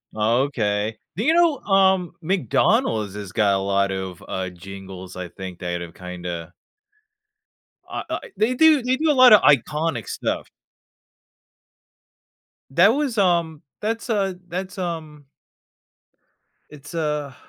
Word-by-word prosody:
Okay. 110 -2 0 0.2
Do 205 - -2
you 310 +6 +3
know, 335 -4 +4
um, 190 -3 +2
McDonald's 115 - +1
has 100 -3 -7
got 100 0 +2
a - - +1
lot 100 0 +1
of, 95 -2 -5
uh, 95 -1 -3
jingles, 95 0 -10
I 90 -1 -5
think, 95 0 -9
that 85 -1 -3
have 85 -1 -8
kinda 90 -2 -7 1.4
ah - - -5 0.2
i - - -12
they 220 +5 +2
do 310 0 +5
they 250 +2 +1
do 315 +2 +1
a - - +3
lot 255 -3 +8
of 210 - +8
iconic 150 - +2
stuff. - - -3 2.2
That 175 +8 +6
was, 275 -4 -1
um, 170 -5 +1 0.2
that's 225 +3 -3
a 195 -4 0
that's, 185 +2 -5
um 160 -5 -5 1.4
It's 150 +2 -12
a 150 -4 -2
150 Hz, 130 wpm, -22 LUFS, -, 2.2 s, lot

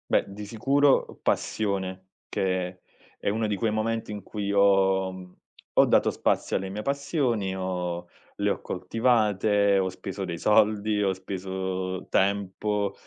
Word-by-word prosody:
Beh, - - +4
di 105 +1 -8
sicuro 135 +6 +2
passione, 95 -3 -1 0.2
che 90 -1 -2 0.4
è - - -1
uno 110 +1 0
di 105 - 0
quei 110 +2 0
momenti 110 +1 -1
in 105 -2 -6
cui 105 0 -5
io 100 0 +2
ho 95 -2 +1
dato - - +3
spazio - - 0
alle 95 - -4
mie 100 +2 -4
passioni, 130 - -1
ho 90 -2 -3 0.3
le - - 0
ho - - -1
coltivate, 105 -4 +2
ho 95 - +1
speso 95 +1 -5
dei 85 -2 -4
soldi, 105 +1 +3
ho 95 -2 +2
speso 95 0 -4
tempo, 100 +1 0
100 Hz, 140 wpm, -26 LUFS, 95-105 Hz, 0.4 s, Beh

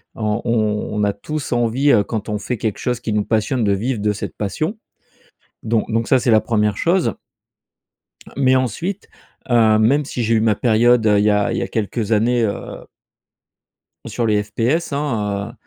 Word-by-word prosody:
On 105 -2 -1
on 110 -3 0
on 105 -1 0
a 100 -1 +1
tous 150 +9 -6
envie, 120 +4 +2
heu, 105 -3 +4
quand 110 +1 -5
on 105 0 -2
fait 120 +5 -3
quelque 110 -1 -3
chose 125 -2 -2
qui 120 -3 -3
nous 105 -1 0
passionne 115 +3 0
de 100 -1 +2
vivre 115 +4 -2
de 105 0 +1
cette 105 - -6
passion. 155 - -3 0.9
Don 115 0 0
donc 115 0 -1
ça 130 - +4
c'est 120 - 0
la 110 -1 +5
1re 105 -3 0
chose 175 - +1 1.2
mais 130 -1 +3
ensuite, 130 - -2 0.4
heu, 110 -3 +4
même 140 +7 +3
si 125 -3 -3
j'ai 115 +1 +2
eu 110 - +2
ma 110 -2 +2
période, 120 +1 +3
heu, 105 -1 +4
il 105 - +2
y - - +4
a 105 -1 +1
il - - -2
y - - -1
a - - -2
quelques 110 0 -3
années, 115 +2 +2
heu 105 -2 -5 1.2
sur 120 - -2
les 105 -2 +2
FPS, 120 +10 -1
hein, 105 -9 -2
heu. - - -19
115 Hz, 195 wpm, -19 LUFS, 105-125 Hz, 1.2 s, la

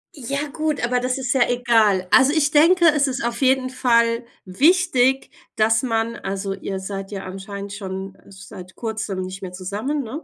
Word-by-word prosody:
Ja 280 +2 -3
gut, 310 -1 -1
aber 245 +1 +1
das 255 +1 -1
ist 255 -1 -1
ja 265 - +1
egal. 225 -6 +2
Also, 265 +3 +5
ich 300 -2 +2
denke, 340 +3 +5
es 285 -1 +2
ist 260 -2 -3
auf 235 +1 -3
jeden 260 -1 +2
Fall 235 -2 +2 0.2
wichtig, 265 - +2 0.2
dass 220 +1 +3
man 230 -2 -1
also, 195 0 -4
ihr 195 0 -5
seid 195 0 -6
ja 195 -2 -6
anscheinend 200 +1 -7
schon 190 -1 -6
seit 190 -1 -12
Kurzem 215 -4 -4
nicht 185 +1 -7
mehr 185 -2 -7
zusammen, 210 +11 -3
ne? 265 +8 -7
230 Hz, 175 wpm, -21 LUFS, 195-265 Hz, 0.2 s, Also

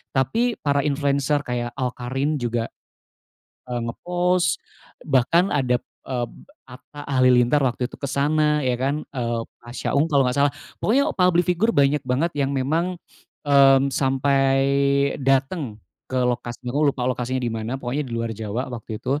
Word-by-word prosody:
tapi 225 - +1
para 140 0 +1
influencer 140 0 +1
kayak 120 -2 -3
Awkarin 130 +3 -2
juga, 120 -1 -2 1.0
eee, 120 -1 -2
nge-post, 180 +7 0 0.5
bahkan 150 +7 +3
adab 125 -4 +2 0.3
ep 120 -3 -2 0.3
Atta 135 +3 -12
Halilintar 130 0 +4
waktu 125 -1 0
itu - - -12
ke 140 - -3
sana, 150 +2 +1
ya 130 - +2
kan, 140 +3 -1
eee, 120 -3 -2
b - - -22
Pasha 120 +1 -5
Ungu 145 +3 +2
kalau 140 -4 +3
nggak 125 +3 -1
salah. 145 -1 +3 0.3
Pokoknya 270 +6 +2
public 180 -1 +3
figure 190 +6 +1
banyak 140 +1 +3
banget 145 +7 0
yang 135 -1 +1
memang, 165 +7 0 0.5
mmm, 140 -1 +5
sampai 135 0 +2 0.6
dateng 135 - 0 0.3
ke 130 - -1
lokasi, 120 0 -3
aku 145 +1 +2
lupa 125 -2 -4
lokasi 125 0 -1
nya 130 - -2
di 115 - -1
mana, 115 +3 -3
pokoknya 130 +3 -3
di 120 - -8
luar 115 -1 -2
Jawa 110 +4 -4
waktu 115 -2 -6
itu. 140 +4 -1
135 Hz, 155 wpm, -23 LUFS, 125-150 Hz, 1.0 s, mmm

